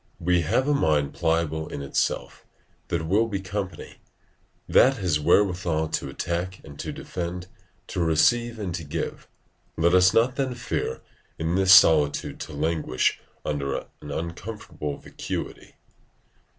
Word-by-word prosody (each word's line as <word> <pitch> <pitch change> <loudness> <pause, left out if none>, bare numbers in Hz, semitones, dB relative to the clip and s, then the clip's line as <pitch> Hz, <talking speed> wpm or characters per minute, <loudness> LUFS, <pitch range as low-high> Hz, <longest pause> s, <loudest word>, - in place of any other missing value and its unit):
We 90 0 +2
have 130 - +1
a 150 - +3
mind 75 - +1
pliable 80 -1 0
in 70 - -6
itself, 70 - -2 0.4
that 80 -2 -2
will 105 +6 +3
be 100 -3 -3
company; 95 -2 -5 0.7
that 135 0 +5
has 90 -7 +1
wherewithal 85 -1 +2
to - - -2
attack 90 +2 -3
and 70 -2 -12
to - - -4
defend, 90 0 -5 0.4
to - - -5
receive 85 +9 +2
and 100 -5 -4
to 85 - -4
give: 80 +2 -5 0.5
let 85 +2 +3
us 90 0 +6
not 120 +5 +2
then 130 -3 -1
fear 120 - -3 0.4
in 80 +1 -1
this 95 0 +4
solitude 80 -6 +5
to 80 - -7
languish 75 -3 0 0.3
under 70 -2 -1 0.2
an 75 - -9
uncomfortable 85 -2 -5
vacuity. - - -6
85 Hz, 135 wpm, -25 LUFS, 80-95 Hz, 0.7 s, us